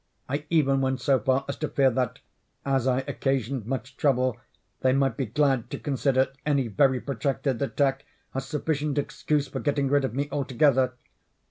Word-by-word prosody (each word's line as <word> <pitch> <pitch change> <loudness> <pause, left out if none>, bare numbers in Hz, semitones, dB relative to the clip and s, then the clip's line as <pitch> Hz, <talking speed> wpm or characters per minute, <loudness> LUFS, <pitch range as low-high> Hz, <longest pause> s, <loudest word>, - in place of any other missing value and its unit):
I 145 +3 -3
even 140 -5 +3
went 130 0 0
so 135 +1 +3
far 130 +4 +1
as 140 - -4
to 155 - -2
fear 135 -2 +3
that, 125 -1 -1 0.5
as 135 -2 +1
I 130 0 +2
occasioned 135 -3 -1
much 130 +1 -4
trouble, 130 -4 +2 0.4
they 130 0 +3
might 135 0 +2
be 135 -4 -2
glad 135 0 +1
to - - -4
consider 135 -2 +1
any 140 -4 +1
very 130 +5 +3
protracted 135 -1 -2
attack 135 -1 0 0.3
as 135 0 -3
sufficient 150 0 -1
excuse 145 0 0
for - - -5
getting 140 -2 0
rid 145 0 +3
of 130 - -2
me 140 +1 -1
altogether. 130 -1 +2
135 Hz, 170 wpm, -26 LUFS, 130-140 Hz, 0.5 s, even